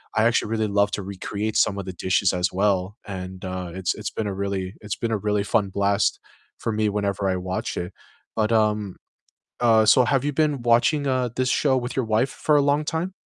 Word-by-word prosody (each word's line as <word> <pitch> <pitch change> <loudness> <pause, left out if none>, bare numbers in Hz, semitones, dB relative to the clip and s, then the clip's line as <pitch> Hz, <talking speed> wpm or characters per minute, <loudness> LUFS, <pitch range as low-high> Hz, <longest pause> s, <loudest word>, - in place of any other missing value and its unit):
I 110 - +3
actually 115 -2 +2
really 110 -1 +1
love 100 0 +2
to 100 - -3
recreate 100 +2 -4
some 100 - +2
of 95 - -5
the 95 - -6
dishes 95 +2 +1
as 90 -1 +1
well. 95 +1 0
And, 95 -1 -6
uh, 90 -1 -4
it's 95 -2 -1
it's 105 - -4
been 110 - -3
a 100 - -2
really 95 -1 -3
it's 105 -2 -4
been 115 -1 -2
a 110 - +1
really 105 -1 +2
fun 105 -1 +1
blast 100 +1 +1 0.4
for 115 - -2
me 105 0 +1
whenever 100 -1 -1
I 95 - +1
watch 90 0 -3
it. 90 +1 -4 0.4
But, 110 0 +1
um, 105 -3 +1 0.7
uh, 115 -2 +5
so 125 +3 +6
have 135 +2 +1
you 145 - 0
been 150 -4 +1
watching, 120 +5 +3
uh, 130 -2 +1
this 130 0 +1
show 135 -1 +2
with 125 0 -3
your 130 -4 0
wife 115 +4 +1
for 150 -1 +1
a 145 - +4
long 145 +2 +2
time? 170 +4 -2
105 Hz, 220 wpm, -24 LUFS, 95-120 Hz, 0.7 s, so